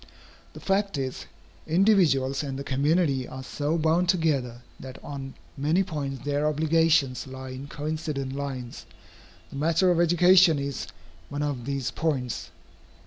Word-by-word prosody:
The - - -10
fact 195 -3 0
is, 130 -2 -4 0.4
individuals 160 -8 +3
and 135 -3 -4
the 140 - -5
community 140 -1 +1
are 130 0 -8
so 150 +4 -2
bound 165 +3 +2
together, 140 - 0 0.2
that 130 -1 -9
on 135 -2 -7 0.2
many 155 +7 +2
points 140 -6 -5
their 145 +1 +1
obligations 155 -3 +2
lie 130 0 -8
in 130 +2 -7
coincident 150 -2 -4
lines. 135 -3 -6 0.6
The - - -7
matter 165 +5 +3
of 170 - +2
education 175 0 +6
is 140 -1 -4 0.4
one 145 +1 -3
of 135 -5 -3
these 140 -2 -2
points. 135 -7 -2
145 Hz, 140 wpm, -26 LUFS, 135-165 Hz, 0.6 s, education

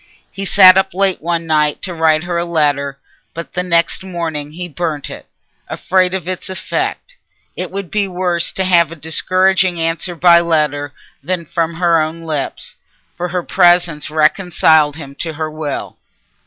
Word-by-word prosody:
He 195 - -5
sat 190 -1 +7
up 190 -1 -2
late 195 -1 +1
one 170 +1 -2
night 150 -2 +1
to 185 - -3
write 160 -1 +2
her 175 -1 -2
a - - 0
letter, 145 -4 0 0.4
but 170 0 -7
the 180 - -1
next 170 0 0
morning 160 -5 -5
he 180 +2 -5
burnt 160 -3 -4
it, - - -10 0.4
afraid 185 0 0
of 180 -3 -5
its 185 0 -5
effect. - - -4 0.4
It - - -4
would 195 -2 -6
be 205 -2 0
worse 180 -2 -1
to 190 - -1
have 170 -3 +3
a - - -7
discouraging 185 +3 +1
answer 165 +2 -2
by 170 0 +6
letter 150 -4 0 0.3
than 175 +2 -3
from 165 0 -2
her 170 -1 +2
own 160 +2 -4
lips, 155 -4 -4 0.4
for 175 +1 -3
her 180 0 -3
presence 175 -5 +2
reconciled 155 -1 +3
him 140 -4 -9
to 165 -2 -3
her 155 0 -4
will. 155 -2 -5
170 Hz, 170 wpm, -16 LUFS, 155-180 Hz, 0.4 s, sat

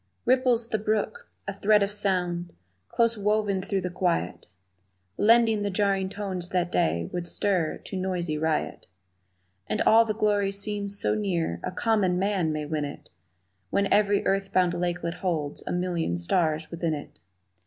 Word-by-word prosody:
Ripples 250 -2 +2
the 220 - 0
brook, 220 - -2 0.2
a 200 - -2
thread 205 +1 +3
of 200 - -1
sound 180 -4 0 0.3
Close 230 -2 +1
woven 205 -1 +1
through 195 0 -1
the 180 0 -4
quiet, 175 - -1 0.7
Blending 225 - +4
the 205 - -1
jarring 195 -1 +1
tones 190 -3 -4
that 180 -2 0
day 85 - +1
Would 175 -1 -3
stir 180 -4 0
to - - -7
noisy 180 -4 -2
riot. 155 0 -2 0.8
And 105 - -1
all 225 +1 +6
the 215 -2 -2
glory 205 -2 +1
seems 200 0 -3
so - - +1
near 175 - -1
A - - -3
common 190 -2 +1
man 190 -4 0
may 155 -1 -3
win 150 0 -2
it 145 0 -8 0.6
When 200 0 +1
every 205 -1 +3
earth 195 0 0
bound 180 -2 +3
lakelet 175 0 -2
holds 155 -6 -2
A - - -2
million 175 - -1
stars 155 - 0
within 170 -2 -1
it. 145 - -10
190 Hz, 160 wpm, -26 LUFS, 170-205 Hz, 0.8 s, all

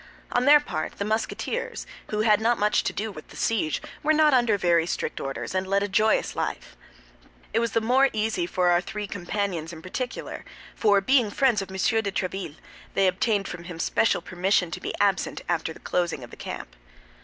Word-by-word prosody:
On 245 +1 +1
their 295 +1 +8
part 155 - -4
the 200 - -4
Musketeers, 220 - -2 0.2
who 210 0 -1
had 215 -1 +4
not 235 +1 +3
much 210 +1 +2
to - - +1
do 215 +1 -3
with 155 -5 -11
the - - -14
siege, 195 -9 0 0.2
were 310 +1 +3
not 305 -1 +5
under 240 -5 +4
very 170 -3 +2
strict 155 - -3
orders 135 +5 -4
and 185 0 -1
led 200 +1 +2
a - - 0
joyous 215 +2 +2
life. - - -4 0.8
This 225 - +3
was 230 -1 -1
the 230 - +2
more 260 +4 +4
easy 220 +11 -1
for 185 - +1
our 175 0 +4
three 210 +2 -5
companions 180 -3 -3
in 160 -1 -10
particular; 245 +7 -5 0.3
for 205 -2 +3
being 250 0 +3
friends 240 -2 +2
of 195 - -7
M. 190 - -8
de 220 +1 +1
Tréville, 185 -5 -3 0.4
they 195 - +4
obtained 195 +2 +1
from 175 -1 -7
him 175 -2 -7
special 200 +6 +1
permission 185 -1 +1
to - - -5
be - - -3
absent 200 -2 +1
after 165 -2 -1
the - - -11
closing 170 -7 -1
of 120 - -11
the - - -9
camp. - - -7
200 Hz, 200 wpm, -26 LUFS, 180-225 Hz, 0.8 s, their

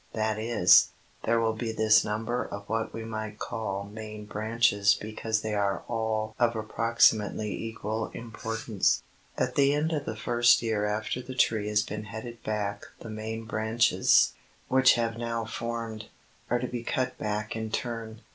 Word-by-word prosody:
That 110 -1 0
is, 110 -6 +6 0.4
there 115 +1 +3
will 115 -1 +1
be 110 +1 -3
this 110 -1 +4
number 115 +4 -2
of 100 0 -8
what 110 0 -1
we 115 0 -6
might 110 -1 -5
call 110 -5 -3
main 105 +1 -8
branches 105 -1 +2
because 110 0 -2
they 110 -1 -3
are 100 -1 0
all 110 -2 -1
of 120 -1 +3
approximately 110 -1 +2
equal 110 0 -3
importance. 115 -2 -1 0.3
At 125 0 0
the 140 +1 +4
end 155 +2 0
of 150 -3 -2
the 110 - -4
first 120 +2 +4
year 110 -2 0
after 110 +4 -2
the 130 +1 -8
tree 110 -4 +2
has 105 0 +2
been 105 +1 -6
headed 115 +2 -8
back 100 -1 -3
the 115 - -7
main 110 +1 -5
branches, 110 +1 +3 0.4
which 130 0 +6
have 115 -1 -1
now 115 -1 -2
formed, 115 -1 -5 0.4
are 120 - +2
to 125 - -2
be 120 -1 -4
cut 130 +2 -1
back 105 +1 -2
in 110 0 -3
turn. 115 -1 -4
110 Hz, 165 wpm, -28 LUFS, 110-115 Hz, 0.4 s, is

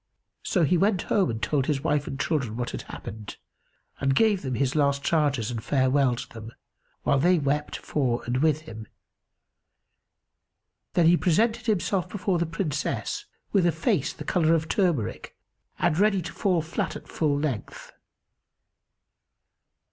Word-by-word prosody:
So 180 - +1
he 170 +3 +3
went 195 -1 +2
home 195 - +1
and 110 -1 -3
told 140 -3 +1
his 140 -3 0
wife 145 -1 0
and 135 - -5
children 135 -10 -1
what 125 -1 -3
had - - -5
happened 105 -1 -9 0.6
and 135 -1 +1
gave 210 -1 +3
them 130 -2 -3
his 130 +2 0
last 140 -1 +2
charges 140 -8 +1
and 115 -2 -4
farewelled 130 -2 +1
them, 115 +1 -10 0.5
while 140 - +2
they 175 +5 +4
wept 150 0 -1
for 125 -5 -1
and 120 +1 -1
with 155 0 +2
him. 110 -7 -10 2.1
Then 170 - +3
he 175 +2 +6
presented 225 +8 +1
himself 195 -3 0
before 190 -3 -1
the 170 - 0
Princess, 160 -3 -2 0.3
with 190 -4 +3
a - - +4
face 165 - 0
the - - -9
colour 165 -2 +3
of 160 -1 -1
turmeric 165 - -1 0.4
and - - +2
ready 200 -3 +3
to - - -7
fall 180 -6 +1
flat 165 - -3
at - - -9
full 150 -3 0
length. 145 -7 -4
150 Hz, 155 wpm, -26 LUFS, 135-175 Hz, 2.1 s, he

